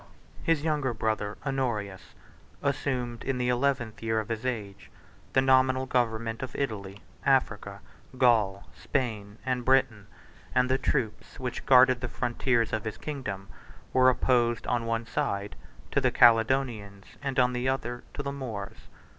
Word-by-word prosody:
His 165 -3 +1
younger 145 -6 0
brother 110 -1 -1
Honorius, 120 -8 -3 0.5
assumed, 130 -4 -2
in 135 -1 -1
the 125 0 0
eleventh 125 -3 0
year 110 -1 0
of 110 - -5
his 115 +2 -2
age, 105 -6 -5 0.4
the 130 - +4
nominal 130 0 +4
government 115 -3 -1
of 130 - -6
Italy, 100 -7 -4 0.2
Africa, 110 -7 +1 0.4
Gaul, 110 -6 +3
Spain, 110 -6 -3
and 130 -1 -1
Britain; 130 -6 +2 0.5
and 125 0 +3
the 130 - +2
troops, 110 -3 -2
which 125 -2 -5
guarded 130 -1 +6
the 120 - -2
frontiers 120 -1 0
of 110 - -1
his 110 - -5
kingdom, 105 -10 -5 0.5
were 130 0 +6
opposed, 120 -2 +2
on 120 -2 -1
one 115 0 -1
side, 105 -8 -2 0.4
to - - +2
the - - +3
Caledonians, 115 -4 +3 0.2
and 135 -2 -3
on 125 -1 +4
the 125 +1 0
other, 120 -2 -3
to 145 - -4
the 140 - -3
Moors. 115 -6 -7
120 Hz, 145 wpm, -28 LUFS, 110-130 Hz, 0.5 s, guarded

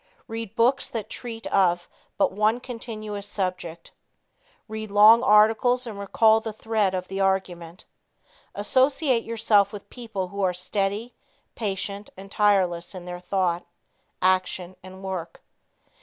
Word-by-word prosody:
Read 225 -2 -6
books 245 +3 +2
that 225 -4 -6
treat 230 -2 -7
of 175 -2 +2 0.3
but - - +2
one 215 +4 +1
continuous 215 -4 -6
subject. 185 -4 -4 0.8
Read 220 -1 -6
long 210 +3 +7
articles 225 +3 +4
and 215 -4 -7
recall 220 +2 +4
the 220 0 -5
thread 215 -3 0
of 185 0 -4
the 195 +1 -5
argument. 185 -3 -2 0.7
Associate 260 +3 +2
yourself 215 -3 +2
with 205 -2 -9
people 220 -7 -5
who 200 +2 -5
are 185 -2 +1
steady, 200 +5 -2 0.4
patient 200 -1 -4
and 195 +1 -11
tireless 190 -4 +1
in 180 -1 -8
their 180 0 -6
thought, 180 -2 -1 0.6
action 185 -1 +1
and 190 +1 -12
work. 185 -3 -5
205 Hz, 130 wpm, -25 LUFS, 185-225 Hz, 0.8 s, long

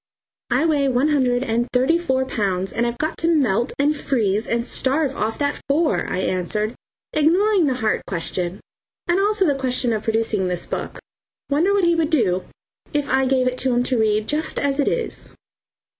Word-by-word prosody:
"I 255 +6 +2
weigh 290 -4 +2
one 265 +3 +2
hundred 255 -4 +2
and 235 0 0
thirty 265 +7 +2
four 265 -6 0
pounds, 195 -6 -2
and 235 +1 0
I've 235 0 -3
got 310 +4 -3
to 330 - +1
melt 240 -5 +1
and 290 +2 +2
freeze 220 -7 0
and 235 0 -1
starve 275 +2 0
off 220 +1 -2
that 285 0 -2
four," 305 +3 +1
I - - -1
answered, 210 +5 -1 0.4
ignoring 355 +4 +3
the 260 - +1
heart 220 -4 0
question 180 +1 -3 0.5
and 350 +2 +2
also 410 0 +2
the 295 - +3
question 255 -3 -1
of 215 - -1
producing 220 -3 0
this 180 -1 -2
book. - - -5 0.5
Wonder 325 +8 +3
what 400 -1 +2
he 340 0 +4
would 325 -2 +1
do 200 - +1 0.5
if 290 -2 -1
I 265 -1 +2
gave 260 -1 +2
it 255 0 -1
to 255 -2 +1
him 245 - +2
to 250 -1 0
read 215 -1 +2
just 310 +1 -2
as 280 0 0
it 285 - +2
is? 480 - -2
260 Hz, 190 wpm, -21 LUFS, 225-300 Hz, 0.5 s, he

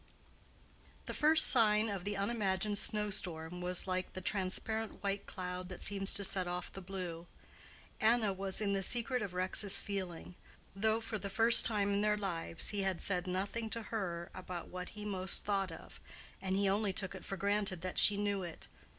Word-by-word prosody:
The - - -5
first 315 +1 +6
sign 215 -3 +6
of 200 -3 -5
the 205 0 -3
unimagined 200 -1 -1
snow 210 -1 +1
storm 175 -2 -4
was 180 0 0
like 185 -1 -3
the - - -6
transparent 210 +4 -2
white 200 0 -3
cloud 180 -1 -6
that 180 - -5
seems 195 -1 -1
to 200 - -2
set 190 -2 0
off 180 0 -5
the 195 - -8
blue. 175 -3 -7 0.7
Anna 220 -2 +2
was 195 +1 0
in 200 -1 0
the 195 - -1
secret 240 +5 +1
of 195 -4 -5
Rex's 185 +2 +1
feeling; 185 -4 -5 0.4
though 220 +3 0
for 225 -1 -5
the 200 - -5
first 225 +3 +8
time 205 -3 0
in 200 - 0
their 210 0 +1
lives 170 -5 -1
he 205 -1 -1
had 190 -2 -1
said 180 -2 -1
nothing 200 +5 -3
to 230 - -2
her 175 -5 -4
about 180 -2 -8
what 180 0 -7
he 210 - -7
most 190 -3 +2
thought 195 -3 -1
of, 165 - -12 0.4
and 190 0 -2
he 200 0 +1
only 200 0 0
took 190 0 -1
it 190 - -10
for 195 - -6
granted 200 -2 -2
that 185 0 -1
she 205 - +6
knew 205 -1 -1
it. 170 -3 -8
195 Hz, 190 wpm, -33 LUFS, 185-210 Hz, 0.7 s, first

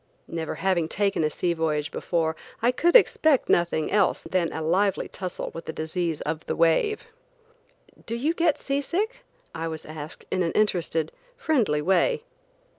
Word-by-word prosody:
Never 165 -1 -4
having 185 -4 +1
taken 200 -3 +1
a 155 - +2
sea 170 +3 -1
voyage 155 -3 -1
before, 160 -2 -1 0.2
I 235 +2 +3
could 340 +7 +2
expect 315 - +5
nothing 170 -2 +2
else 205 -3 +2
than 180 -3 0
a - - -4
lively 190 +4 +1
tussle 185 -1 -5
with 165 - -7
the 160 - -5
disease 160 0 -2
of 160 +1 -3
the - - -1
wave. 170 - +2 1.0
"Do 230 - -2
you 290 +8 0
get 335 -3 +2
sea 275 +1 -1
sick 435 - -2 0.2
?" - - -37
I 165 0 -3
was 160 -1 -6
asked 155 0 -8
in 185 - +1
an 165 -2 0
interested, 170 -6 +1 0.3
friendly 235 - +1
way. 450 - +2
180 Hz, 170 wpm, -26 LUFS, 160-250 Hz, 1.0 s, expect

